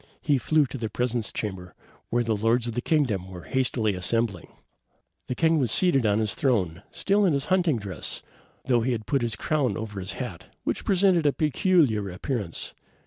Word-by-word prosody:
He 145 -3 +1
flew 155 +3 +3
to 130 0 -7
the 110 -2 -3
presence 120 0 -1
chamber, 95 -4 -5 0.3
where 120 0 +1
the 115 -2 0
lords 115 +3 +2
of 120 - -3
the 120 - -2
kingdom 120 - 0
were 90 -2 -9
hastily 125 -5 0
assembling. 100 +1 -1 0.8
The 125 - -2
king 160 +1 +3
was 125 -4 +1
seated 135 - +4
on 105 0 +2
his 110 -1 +1
throne, 105 - 0
still 205 +1 +1
in 180 -5 +3
his 140 -1 0
hunting 175 -8 +2
dress, 95 - -5 0.4
though 120 -3 +3
he 125 +2 0
had 110 -2 -4
put 140 -3 +1
on - - +1
his 115 -1 -2
crown 135 -8 0
over 105 -3 -5
his 95 +1 -4
hat, 115 -10 -6 0.2
which - - -2
presented 185 -5 +3
a 145 - +3
peculiar 150 - +2
appearance. 100 - -4
120 Hz, 195 wpm, -26 LUFS, 105-145 Hz, 0.8 s, seated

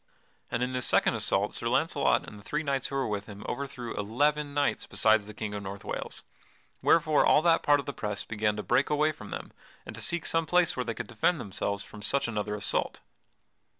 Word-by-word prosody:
And 120 +1 -1
in 125 +1 -2
this 125 -1 +2
second - - +4
assault - - +1
Sir - - -3
Launcelot - - +2
and 105 - -10
the - - -15
three 150 +8 -2
knights 135 -3 -1
who 135 - -6
were 135 -1 0
with 105 0 -3
him 105 -1 -10
overthrew 130 -4 -4
eleven 145 +8 0
knights 145 0 0
besides 110 -2 +3
the 105 - -8
King 110 -1 -4
of 105 - -4
North 100 0 -7
Wales, - - -4 0.6
wherefore 155 -2 +4
all 150 - +5
that 165 -1 +4
part 145 0 +4
of 140 - -5
the 140 - -4
press 105 -3 -3
began 105 -1 -1
to 105 - -4
break 130 +3 +2
away 150 +1 +2
from 105 -8 -11
them - - -6 0.3
and - - -8
to - - -7
seek 175 -1 -1
some 165 -1 +2
place 180 +1 +3
where 125 - -1
they 115 -2 -4
could 125 - -4
defend 120 +10 +1
themselves 100 0 -3
from 105 - -12
such 135 +7 0
another 105 -2 -2
assault. 105 0 -1
120 Hz, 220 wpm, -29 LUFS, 105-145 Hz, 0.6 s, all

